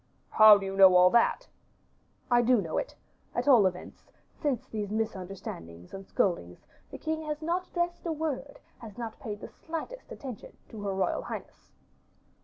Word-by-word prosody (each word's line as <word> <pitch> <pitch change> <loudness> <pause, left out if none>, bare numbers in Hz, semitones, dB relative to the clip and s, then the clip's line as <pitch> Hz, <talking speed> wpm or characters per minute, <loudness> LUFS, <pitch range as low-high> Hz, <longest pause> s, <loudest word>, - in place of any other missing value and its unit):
"How 215 -1 +9
do 195 - -5
you 195 0 -4
know 190 -1 +8
all 180 0 +7
that?" 235 - +2 0.8
"I 240 0 +6
do 245 0 +4
know 165 -5 -2
it; - - -6 0.4
at - - -1
all 235 -8 +7
events, 180 -1 -8 0.3
since 280 -7 -2
these 210 -2 -5
misunderstandings 190 - -5
and 195 0 -8
scoldings, 90 - -1 0.2
the - - -8
king 315 0 -3
has 300 0 -3
not 350 +3 -1
addressed 345 0 -3
a - - 0
word, 295 -3 -4 0.2
has 225 -2 -11
not 230 -2 -6
paid 210 -3 -6
the - - -7
slightest 330 +10 -8
attention, 255 -7 -9
to 220 - -9
her 200 -1 -2
royal 190 - 0
highness." - - -9
220 Hz, 170 wpm, -29 LUFS, 195-290 Hz, 0.8 s, How